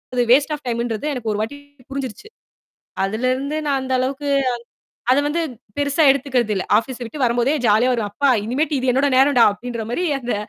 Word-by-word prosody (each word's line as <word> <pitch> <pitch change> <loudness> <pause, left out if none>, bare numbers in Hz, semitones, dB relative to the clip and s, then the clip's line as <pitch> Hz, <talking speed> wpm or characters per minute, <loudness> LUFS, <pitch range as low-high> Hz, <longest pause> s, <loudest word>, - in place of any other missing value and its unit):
அது 245 - +3
waste 290 +4 +4
of 295 - -13
டைம்ன்றது 235 +1 -2
எனக்கு 230 -5 -3
ஒரு 210 - -3
வாட்டி 225 +6 -4 0.3
புரிஞ்சிருச்சு. 270 - -6 0.8
அதிலருந்து 255 +8 -1
நான் 275 -2 +1
அந்த 260 0 -4
அளவுக்கு 275 +3 -2
அத - - +1 0.7
அதுவந்து 290 +5 +1 0.4
பெருசா 285 +2 +2
எடுத்துக்கிறதில்லை. 250 -8 -1
ஆஃபீஸ் 245 +2 -3
விட்டு 265 +6 -8
வரும்போதே 245 +4 +2
ஜாலியா 220 +4 +4
வருவேன். 225 -5 -2
அப்பா! 280 +7 +1 0.2
இனிமேட்டு 290 +6 0
இது 255 0 0
என்னோட 270 +3 +2
நேரம்டா! 265 -3 +5
அப்பிடின்றமாரி 235 - -4
அந்த 245 -2 -3
255 Hz, 160 wpm, -20 LUFS, 235-285 Hz, 0.8 s, நேரம்டா